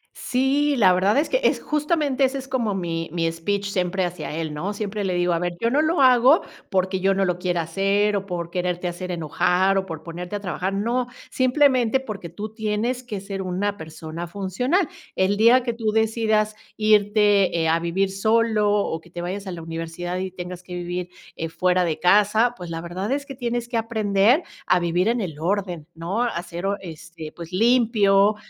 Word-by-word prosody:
sí, 275 +3 +1
la 190 -7 +5
verdad 195 +6 +2
es 300 - +2
que, - - 0
es - - +3
justamente 295 -2 0
ese 265 +1 +2
es 265 - -7
como 235 -6 -1
mi 165 -3 -3
mi 165 -1 0
speech 200 +5 -2
siempre 185 -1 0
hacia 175 -2 -5
él, 160 -2 -3
¿no? 185 +8 -3
Siempre 205 0 -3
le 185 -2 -1
digo: 175 0 +1
"A 165 - 0
ver, 175 0 -2
yo 230 +1 +1
no 295 +3 +3
lo 315 -2 +1
hago 255 +4 +6 0.3
porque 190 -1 0
yo 195 +1 +2
no 195 - +2
lo 180 -1 -1
quiera 175 -2 0
hacer 195 +4 +1
o 195 0 -3
por 170 -2 -4
quererte 180 0 -2
hacer 180 +1 -5
enojar 180 +4 +1
o 190 - -5
por 160 -2 -7
ponerte 175 +3 -6
a - - -2
trabajar, 185 0 -3
no, 240 +5 0 0.2
simplemente 255 -2 +3
porque 210 -9 -7
tú 210 +5 -7
tienes 220 +3 -1
que 215 -6 -6
ser 195 -1 -5
una 190 +2 -1
persona 160 0 -7
funcional. 245 - 0 0.3
El 190 +2 +2
día 240 +3 +6
que 235 -2 -1
tú 225 -2 -1
decidas 220 -1 +1 0.2
irte, 205 -3 +3
eh, 160 - +1
a 165 +1 +3
vivir 190 +3 0
solo 215 +1 +2
o 200 -5 0
que 175 - -19
te 175 0 -6
vayas 195 +3 -4
a 190 - -3
la 165 -2 -7
universidad 165 +2 -5
y 190 0 -3
tengas 180 0 -7
que 180 -1 -8
vivir, 175 0 -4 0.3
eh, 165 0 -3
fuera 180 +2 +2
de 160 -2 -2
casa, 210 +5 +4
pues 180 -4 -8
la 165 0 -4
verdad 185 +6 -4
es 280 0 -1
que 275 - -8
tienes 240 -1 -2
que 240 -1 -2
aprender 220 - +2 0.2
a 180 - +4
vivir 175 +3 +1
en 235 0 +1
el 160 -6 -5
orden, 180 -3 -2
¿no? 180 +8 -2
A 230 -8 -1
ser 175 +2 -5
orde 200 +1 0
este, 160 0 -10
pues 170 0 -9
limpio, 210 -2 +4
195 Hz, 205 wpm, -23 LUFS, 175-225 Hz, 0.3 s, hago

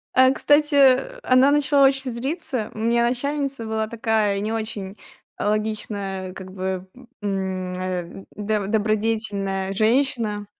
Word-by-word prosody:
А 260 0 +6
кстати, 290 +1 +3 0.5
она 255 +2 +5
начала 285 -1 +4
очень 270 -1 -1
злиться. 255 - -3
У - - -7
меня 235 +1 +2
начальница 275 -1 -2
была 220 0 -1
такая 220 -3 0
не 215 +1 -2
очень, 215 -3 -4 0.4
э, - - -2
логичная, 205 -3 -2
как 190 -1 -9
бы, 190 0 -3 0.4
м, 190 -2 -2
э, 185 0 -5
доб 210 -1 -1
добродетельная 210 -3 0
женщина. 220 -2 +1
215 Hz, 125 wpm, -23 LUFS, 195-250 Hz, 0.5 s, А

